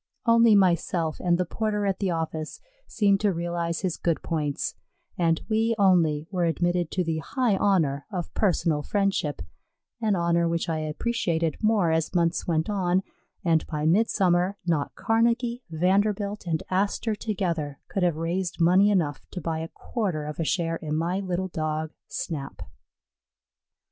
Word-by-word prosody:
Only 230 -2 +6
myself 170 -4 +2
and 175 -1 +2
the 180 - 0
porter 210 +2 -1
at 195 -1 0
the 195 - 0
office 160 -2 -3 0.3
seemed 200 -3 +2
to 205 -1 +2
realize 170 -1 -2
his 185 -4 -1
good 170 -2 -1
points, 150 -3 -2 0.4
and 165 -2 +1
we 225 +1 +1
only 170 -7 +3
were 180 -3 +1
admitted 175 0 0
to 185 - -1
the 160 -1 -1
high 245 - 0
honor 155 -9 +1
of 180 -4 -4
personal 170 -6 +1
friendship, 195 - -1 0.6
an 215 -3 +2
honor 170 -1 +2
which 165 0 -1
I 160 -2 -1
appreciated 165 0 -1
more 215 -6 +3
as 160 +2 0
months 170 0 +1
went 160 -2 +1
on, 190 -2 +1 0.4
and 165 -2 +3
by 150 -1 -3
midsummer 185 0 +2
not 160 -5 0
Carnegie, 235 +2 +1
Vanderbilt, 200 +4 0
and 160 -2 -1
Astor 200 +4 0
together 170 -10 -2
could 195 - -3
have 175 -3 +2
raised 175 +3 -2
money 185 +4 +5
enough 160 -8 +1
to 180 - -4
buy 160 -1 -2
a 160 - -4
quarter 180 -7 -3
of 150 +1 -6
a - - +1
share 165 0 0
in 155 -1 -4
my 170 +4 0
little 185 -1 -2
Dog 155 -1 -2 0.2
Snap. 140 - -5
175 Hz, 155 wpm, -26 LUFS, 160-200 Hz, 0.6 s, Only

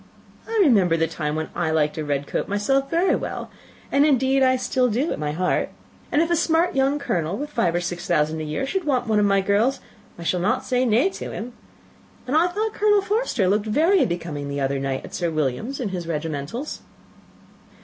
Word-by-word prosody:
I 455 - -2
remember 195 - +4
the 165 - +2
time 150 -2 -3
when 155 0 -3
I 175 -2 -1
liked 155 -1 +1
a 155 - -3
red 145 -1 -1
coat - - -3
myself 270 +7 0
very 345 +3 +2
well - - -5 0.4
and, 280 - +4
indeed, 270 -2 +3
so 260 - +5
I 260 - +3
do - - -1
still 255 +3 +1
at - - -6
my 150 -1 -2
heart; 180 +4 0 0.4
and 300 - +3
if 335 - -3
a - - +4
smart 335 +1 +2
young 270 +1 +2
colonel, 180 - -2
with 295 +2 -5
five 180 - +1
or 175 - +1
six 175 0 -4
thousand 155 -1 +1
a - - -3
year, 155 - -2
should 370 +7 -2
want 255 -4 +1
one 220 -2 +2
of 205 - +3
my 195 -1 +3
girls, 210 +7 +1 0.4
I 170 - -8
shall 180 +2 0
not 235 +8 0
say 255 0 +1
nay 245 - +3
to - - -6
him; 240 +3 -6 0.7
and 260 +3 -1
I 330 +3 +5
thought 425 +4 -2
Colonel 415 -2 +3
Forster 410 - 0
looked 205 +3 +1
very 325 - +3
becoming 165 -5 -4
the 140 0 -3
other 135 0 0
night 135 -1 -3
at - - -12
Sir 175 -2 -1
William's 155 - -2
in 240 -6 -2
his 180 -3 -5
regimentals." 160 - -4
210 Hz, 220 wpm, -23 LUFS, -, 0.7 s, so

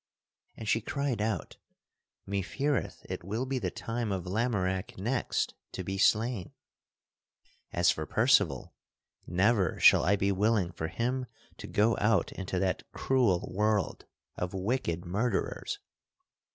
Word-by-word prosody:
And 110 - -7
she 115 - +2
cried 135 0 -2
out: 110 0 -2 0.7
"Mefeareth 115 +9 -1
it - - -5
will 110 +8 -2
be 130 0 -1
the 95 -6 -1
time 115 +3 -3
of 95 -3 -2
Lamorack 95 -2 -1
next 120 +7 -1 0.2
to 95 - -4
be 95 +2 -3
slain. 110 -2 +2 1.2
As 85 0 +4
for 80 -1 -4
Percival; - - +3 0.5
never 95 +1 +2
shall - - +7
I 100 +3 +4
be 100 0 +1
willing 100 -2 +2
for 80 -1 -4
him 125 +8 -2 0.3
to - - -8
go 110 +2 +3
out 105 0 +3
into 95 -1 -4
that 90 -1 0
cruel 120 -10 +1
world 105 0 0 0.3
of 90 +1 -3
wicked 95 -4 -1
murderers. 105 +5 -1
100 Hz, 130 wpm, -30 LUFS, 95-115 Hz, 1.2 s, shall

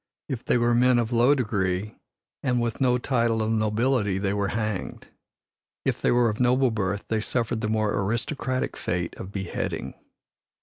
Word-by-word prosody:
If 130 -5 -4
they - - +2
were 120 0 +2
men 125 +1 +4
of 120 -1 0
low 120 +4 +4
degree 100 -5 -1 0.5
and 125 -3 +1
with 120 +1 -2
no 125 -1 +4
title 115 -3 +1
of 110 - 0
nobility 110 -1 +1
they 100 0 0
were 100 -1 0
hanged. 110 -2 -3 0.8
If - - 0
they - - +2
were 120 -1 +4
of 110 -1 -2
noble 125 +1 +3
birth, 100 -2 -2
they 110 -1 0
suffered 115 0 -1
the 105 - -1
more 110 -1 +1
aristocratic 120 +6 -1
fate 85 -1 -2
of 95 - -7
beheading. 95 -3 -4
115 Hz, 170 wpm, -25 LUFS, 105-125 Hz, 0.8 s, men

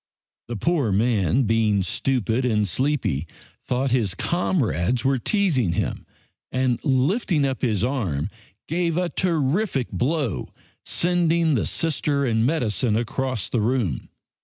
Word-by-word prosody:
The 120 - -4
poor 145 - +1
man, 110 - +2
being 110 -3 +2
stupid 120 +4 0
and 105 -4 +1
sleepy, 130 - -1 0.4
thought 130 +1 -1
his 110 -7 +1
comrades 125 - 0
were 135 -1 +2
teasing 140 - +1
him, - - -3 0.4
and 130 -2 0
lifting 150 - +2
up 135 -2 -2
his 110 -5 +1
arm 95 - -1 0.4
gave 170 0 0
a 180 -1 0
terrific 165 - 0
blow, 125 - -1 0.3
sending 170 -2 +2
the 120 - +1
Sister 145 -3 0
and 115 -1 +2
medicine 125 -6 0
across 125 0 -2
the 120 - -1
room. 110 - -1
130 Hz, 125 wpm, -23 LUFS, 110-155 Hz, 0.4 s, man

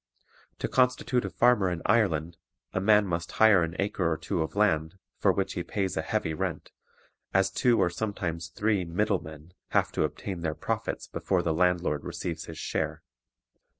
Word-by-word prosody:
To - - -2
constitute 125 -1 +2
a - - -3
farmer 120 -6 +3
in 85 -2 -4
Ireland, 85 -7 +2 0.4
a 95 - 0
man 105 +1 +5
must 85 -2 -3
hire 110 -4 +6
an 80 0 -2
acre 95 -4 0
or 80 - 0
two - - -2
of 80 - -3
land, 80 -5 +1 0.2
for - - +4
which - - -1
he - - -3
pays 95 -2 -2
a 80 - 0
heavy 80 0 -1
rent, 75 - -4 0.6
as 95 0 +3
two 120 +4 +3
or 85 - +3
sometimes 85 -4 -3
three 100 +3 0
"middle 90 +5 0
men" 80 +2 -11 0.2
have - - +2
to - - 0
obtain 95 -4 -4
their 80 -2 -2
profits - - -3
before 90 -2 -1
the 80 - +1
landlord 90 -3 +1
receives 85 -2 -4
his 80 - -9
share. - - -3
90 Hz, 180 wpm, -28 LUFS, 80-105 Hz, 0.6 s, hire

